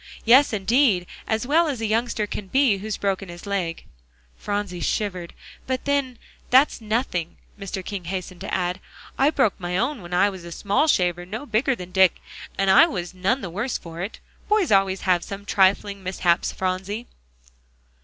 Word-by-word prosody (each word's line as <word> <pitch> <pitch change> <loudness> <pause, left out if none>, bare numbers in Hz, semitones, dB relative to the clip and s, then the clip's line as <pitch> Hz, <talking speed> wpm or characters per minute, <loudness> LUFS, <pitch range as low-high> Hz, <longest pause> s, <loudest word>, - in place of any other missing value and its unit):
"Yes, 260 +5 +6
indeed; 215 -2 +2 0.2
as 220 +2 0
well 320 +5 +3
as 275 -6 -2
a 225 - -2
youngster 220 0 0
can 205 -1 -6
be, 255 -3 +3
who's 215 +1 -4
broken 195 -1 -2
his 175 +2 -10
leg." 185 -5 -3 0.5
Phronsie 205 - -3
shivered. 185 -5 -2 0.3
"But 260 -1 -2
then, 280 -3 0 0.3
that's 260 0 +4
nothing," 215 -6 -2 0.2
Mr. 195 -2 -5
King 195 -4 -5
hastened 185 0 -5
to - - -5
add; 180 0 -1 0.4
"I 275 +2 +4
broke 265 -9 +1
my 180 0 -2
own 270 +4 -1
when 175 0 -11
I 185 +3 +3
was 190 -3 -10
a 170 - -9
small 205 - +1
shaver 175 - +2
no 215 +9 -6
bigger 245 +2 +1
than 180 -4 -9
Dick, 190 -2 +4 0.4
and 195 0 +3
I 320 - +8
was 180 - -5
none 195 +8 0
the 180 - -6
worse 215 +8 -2
for 165 -1 -9
it. 195 +5 -5 0.3
Boys 420 - +2
always 195 -1 +3
have 180 -2 +2
some 195 0 -7
such 200 - -16
trifling 200 +1 +2
mishaps, 180 -2 +1
Phronsie." 190 +5 -3
200 Hz, 180 wpm, -23 LUFS, 185-235 Hz, 0.5 s, I